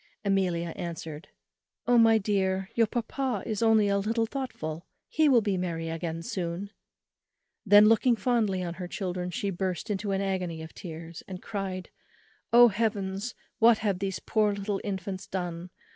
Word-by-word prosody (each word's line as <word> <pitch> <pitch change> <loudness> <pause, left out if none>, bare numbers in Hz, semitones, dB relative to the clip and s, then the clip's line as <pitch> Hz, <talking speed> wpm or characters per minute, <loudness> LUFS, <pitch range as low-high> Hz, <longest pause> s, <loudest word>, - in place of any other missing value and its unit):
Amelia 180 -4 +1
answered, 165 -1 -6 0.6
"Oh! 245 -1 +5
my 225 -1 +6
dear, 190 -2 0
your 230 -1 +3
papa 240 0 -2
is 215 -1 -2
only 220 -2 +4
a 200 0 +2
little 225 +3 0
thoughtful, 220 - -5 0.2
he 315 -1 +3
will 245 -4 +6
be 200 -3 0
merry 165 -2 -3
again 165 0 -4
soon." 180 +3 -4 1.0
Then 205 +1 +8
looking 225 +3 +4
fondly 215 -4 +1
on 170 -1 -3
her 180 - -4
children, 180 -1 -3
she 200 +1 -2
burst 185 +3 -3
into 205 0 -2
an 195 - 0
agony 180 -4 -2
of 160 - -10
tears, 165 -1 -8
and 185 -2 -6
cried, 190 -3 -5 0.6
"Oh 240 0 +8
Heavens; 205 0 -2 0.2
what 230 0 +6
have 195 -3 +1
these 195 -1 -2
poor 215 -2 +1
little 200 0 -3
infants 190 -1 -4
done? 175 -1 -4
195 Hz, 160 wpm, -28 LUFS, 180-220 Hz, 1.0 s, Then